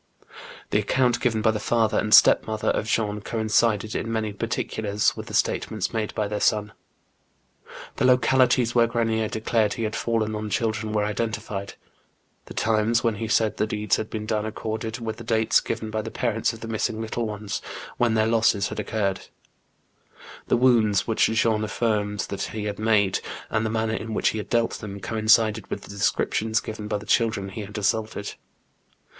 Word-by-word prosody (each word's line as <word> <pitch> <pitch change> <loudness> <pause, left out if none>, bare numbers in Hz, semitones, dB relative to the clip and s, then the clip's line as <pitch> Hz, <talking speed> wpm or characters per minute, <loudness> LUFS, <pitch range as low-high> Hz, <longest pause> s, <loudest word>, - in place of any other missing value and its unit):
The - - +3
account 125 -2 +1
given 110 -4 0
by 110 - +4
the 110 - -3
fiEither 115 -1 +1
and 105 - -2
stepmother 110 0 +5
of 110 - 0
JEAN 115 0 +2
6BENIEB. - - -2
95 105 - -4
Jean 105 - -6
coincided 110 0 +1
in 115 - -2
many 110 -2 -2
particulars 105 -1 -1
with - - -8
the - - -5
statements 110 -1 0
made 110 -2 -2
by 105 - 0
their 105 0 -3
son. 105 -1 +1 1.3
The - - +1
localities 125 -1 +4
where 120 -1 +4
Grenier 115 -1 0
declared 110 -1 0
he 115 - -3
had 110 -1 -2
fallen 110 -2 -1
on 105 0 -4
children 110 0 -1
were 105 -1 +1
identified, 105 -2 -3 0.7
the - - -11
times 110 +2 +1
when 115 -2 +2
he 115 - -3
said 110 -1 +1
the 110 - +1
deeds 105 0 0
had 110 - -4
been 105 -1 -4
done 110 -1 -1
accorded 110 +1 -4
with 110 -2 -5
the 120 - -9
dates 110 0 +3
given 110 -1 -4
by 110 0 -1
the - - -6
parents 115 -3 0
of 115 -1 -11
the 115 - -6
missing 110 0 -2
little 115 +1 -2
ones, 105 -1 -4 0.4
when 120 -2 +2
their 110 0 +3
losses 110 -3 +2
had - - -5
occurred. 100 -3 -2 1.2
The - - +3
wounds 115 -5 +3
which 115 - +2
Jean 110 -1 +1
afiGjrmed 105 -1 -1
that 100 - -4
he 110 -1 -4
had 105 -1 -4
made, 105 -3 +2 0.3
and 110 - +1
the 110 - -1
manner 110 0 -1
in 110 -1 -4
which - - +2
he 110 - -3
had 105 - -7
dealt 115 -1 +1
them, 100 -2 -7
coincided 110 +1 +2
with - - -5
the - - -13
descriptions 110 +2 0
given 110 -1 -6
by 105 0 -1
the 105 - -10
children 110 -5 +1
he 100 +3 -6
had 105 +1 -7
assaulted. 105 0 -1
110 Hz, 190 wpm, -24 LUFS, 105-115 Hz, 1.3 s, stepmother